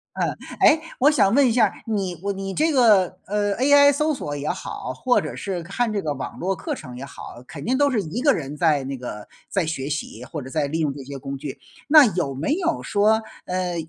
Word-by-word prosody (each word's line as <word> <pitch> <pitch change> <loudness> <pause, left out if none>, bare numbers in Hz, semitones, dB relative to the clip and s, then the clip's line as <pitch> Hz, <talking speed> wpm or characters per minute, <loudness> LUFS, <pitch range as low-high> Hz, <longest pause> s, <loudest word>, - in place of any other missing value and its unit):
嗯。 - - -1 0.3
诶， 315 0 +6 0.2
我 285 +4 +6
想 200 -9 +3
问 280 -1 +5
一 235 - +2
下 225 -2 +4
儿， 195 - -2
你 195 -6 -2
我 200 - 0
你 195 0 -5
这 320 - +2
个， 220 - +4
呃 205 0 0
，AI 285 +3 +6
搜 300 +2 +1
索 145 - -5
也 145 +1 -3
好， 130 - -5
或 245 - +2
者 - - -6
是 190 -3 -4
看 220 +7 -1
这 205 -2 -1
个 150 -2 -2
网 135 - -6
络 190 +2 -1
课 - - -4
程 125 -4 -10
也 135 - -6
好， 120 - -10
肯 - - -9
定 255 +3 +1
都 285 0 +3
是 225 -5 +1
一 190 +8 -4
个 285 0 +5
人 145 -1 -4
在 150 -4 +2
那 135 0 -4
个 115 -4 -7 0.2
在 190 -5 0
学 145 -4 -3
习， 150 0 -5
或 155 - -6
者 130 - -9
在 145 0 -1
利 160 +3 -2
用 150 -3 0
这 135 -1 -9
些 140 +1 -7
工 135 +1 -5
具。 135 0 -7 0.3
那 300 -1 +8
有 150 -7 -1
没 140 - -1
有 340 -2 -1
说， 215 +2 +2 0.2
呃， 180 -1 -2
190 Hz, 260 characters per minute, -23 LUFS, -, 0.3 s, 那